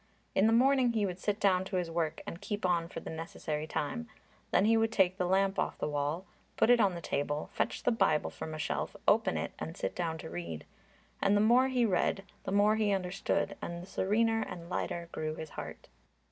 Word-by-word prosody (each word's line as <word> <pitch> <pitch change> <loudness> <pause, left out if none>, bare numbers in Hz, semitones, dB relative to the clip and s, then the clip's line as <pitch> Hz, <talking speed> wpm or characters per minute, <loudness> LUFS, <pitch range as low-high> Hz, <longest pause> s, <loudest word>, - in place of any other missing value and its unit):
In 195 - +4
the - - +4
morning 255 +1 +4
he 215 -3 +1
would 180 -1 -4
sit 205 +2 -1
down 185 -2 +3
to 190 - -4
his 175 -2 -1
work 165 -2 -1
and 170 - -7
keep 205 0 -3
on 170 -2 +2
for - - -6
the - - -7
necessary 160 -2 -4
time, 230 +12 -3 0.4
then 195 - +3
he 225 +1 +5
would 225 0 +2
take 190 -4 +3
the 180 - 0
lamp 195 +1 +2
off - - -1
the - - -2
wall, 150 +4 -2 0.3
put 240 - +5
it 245 - +6
on 195 -5 +3
the 170 - -6
table, 145 0 -2
fetch - - -1
the - - +3
Bible 225 -9 +2
from 155 - -6
a - - -5
shelf, 150 - -2
open - - +4
it, - - -3
and 80 +1 -5
sit 95 - -2
down 165 -2 -2
to 160 - -8
read. 85 -2 -5 0.6
And 200 +1 +4
the - - +3
more 240 +5 +5
he 250 -2 +2
read, 195 0 +1 0.2
the - - -2
more 205 +2 +4
he 215 -2 +2
understood, 190 -1 -1
and 170 0 -4
the 175 - -8
serener 225 +4 +1
and 170 -4 -7
lighter 170 -1 -2
grew 155 0 -3
his 160 -1 -7
heart. - - -8
185 Hz, 225 wpm, -31 LUFS, 160-215 Hz, 0.6 s, it